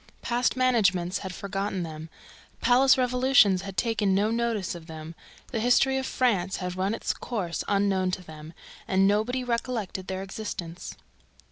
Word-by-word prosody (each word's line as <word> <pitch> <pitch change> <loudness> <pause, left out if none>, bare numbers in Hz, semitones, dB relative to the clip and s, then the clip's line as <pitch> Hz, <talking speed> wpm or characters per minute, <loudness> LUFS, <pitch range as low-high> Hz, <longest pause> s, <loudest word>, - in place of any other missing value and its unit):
Past 245 +1 +1
managements 200 -8 +2
had 190 - -6
forgotten 195 0 -3
them; 160 0 -7 0.5
palace 260 +2 +5
revolutions 250 -6 +4
had 195 -1 -8
taken 210 -1 +1
no 210 +3 +2
notice 230 -5 -1
of 170 -2 -10
them; 160 0 -8 0.4
the 225 - -1
history 245 +3 +3
of 265 - -3
France 200 -7 +1
had 180 -1 -4
run 190 +4 0
its - - -2
course 190 -8 -4
unknown 195 -2 +1
to 185 0 -4
them; 155 -1 -11 0.3
and 190 +1 +3
nobody 220 +5 +1
recollected 235 -6 -3
their 190 0 -3
existence. 180 -4 -6
200 Hz, 150 wpm, -27 LUFS, 185-235 Hz, 0.5 s, palace